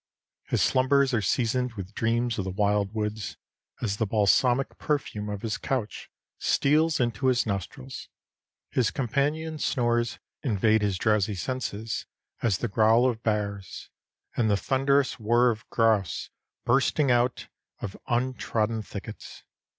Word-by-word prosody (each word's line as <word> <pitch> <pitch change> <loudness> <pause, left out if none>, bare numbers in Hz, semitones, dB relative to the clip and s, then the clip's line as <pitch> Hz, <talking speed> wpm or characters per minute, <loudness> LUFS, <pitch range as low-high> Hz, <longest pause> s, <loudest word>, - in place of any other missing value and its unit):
His - - +1
slumbers 135 +1 +3
are 115 - +2
seasoned 125 +4 0
with 100 -2 -7
dreams 115 0 0
of - - 0
the - - -2
wild 100 +1 +1
woods, 105 -1 -3 0.5
as 100 -3 -1
the 110 - 0
balsamic 120 +5 +2
perfume 110 -8 -2
of 100 -1 -5
his 115 0 -2
couch 125 -6 -3 0.3
steals 155 +3 +2
into 120 +1 0
his 125 -1 +3
nostrils; 115 +6 -5 0.6
his 125 -4 +2
companions' 150 +4 -1
snores 120 -2 +1 0.2
invade 110 -2 +2
his 100 -3 0
drowsy 105 0 +1
senses 115 0 -3 0.3
as 105 -5 +2
the 120 - -2
growl 110 +4 +4
of 115 -3 -2
bears, 100 -4 -3 0.4
and 110 -2 +2
the 100 - +3
thunderous 135 +3 +1
whir 120 +3 +4
of 110 -1 -8
grouse 110 -5 +1 0.3
bursting 135 +2 +3
out 120 +1 +1 0.3
of 95 - -5
untrodden 120 -3 0
thickets. 100 - -9
115 Hz, 135 wpm, -27 LUFS, 105-130 Hz, 0.6 s, growl